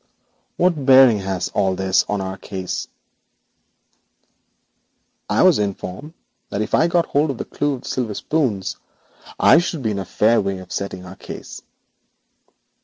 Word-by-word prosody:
'What 175 -5 +1
bearing 130 -4 +7
has 95 -2 -3
all 95 -2 0
this 95 0 +2
on 105 -1 -1
our 95 0 -3
own 95 - -9
case?' 95 -2 -5 2.4
'I - - +3
was - - +5
informed 100 - -4 0.3
that 100 - -1
if - - -8
I 165 - +4
got 170 0 +2
hold 145 +2 +1
of 135 - -3
the - - -5
clue 145 -1 -1
of 125 - -11
the - - -10
silver 115 -5 -2
spoons 120 -12 -1 0.6
I - - +7
should 170 -5 -3
be 110 - 0
in 100 - -3
a 95 - -4
fair 110 +5 +2
way 100 -1 -2
of 95 -1 -12
settling 95 -2 -4
our 90 +1 -10
case.' - - -9
105 Hz, 165 wpm, -21 LUFS, 95-140 Hz, 2.4 s, bearing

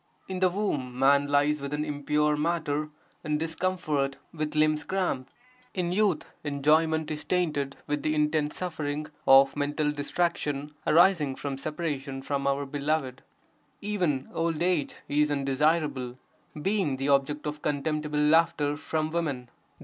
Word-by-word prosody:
In 185 -1 -4
the 185 0 +4
womb 150 -11 -2
man 140 +2 +4
lies 145 +1 +2
within 150 +2 -2
impure 150 0 +1
matter 150 -1 -1 0.3
in 150 -2 0
discomfort 160 -4 -1 0.2
with 155 -1 -3
limbs 155 0 +3
cramped; 180 -9 -2 0.4
in 175 -2 0
youth 200 -2 +2 0.2
enjoyment 155 +2 +2
is 150 0 -4
tainted 150 -6 -1
with 150 0 -2
the 155 0 0
intense 150 0 +1
suffering 155 -4 -3 0.2
of 135 0 +7
mental 150 +1 0
distraction 150 -1 -2
arising 165 -4 +4
from 140 0 -4
separation 140 -2 -4
from 140 0 -1
our 140 +1 +1
beloved; 140 -2 -2 0.6
even 180 -10 -1
old 165 0 0
age 175 -5 0
(is 150 +1 +2
undesirable), 140 -2 0 0.4
being 185 -5 0
the 135 +2 -1
object 140 +2 +1
of 150 0 -4
contemptible 150 +1 -1
laughter 150 -1 +3
from 155 0 -2
women. 145 -8 -2
150 Hz, 135 wpm, -28 LUFS, 140-160 Hz, 0.6 s, of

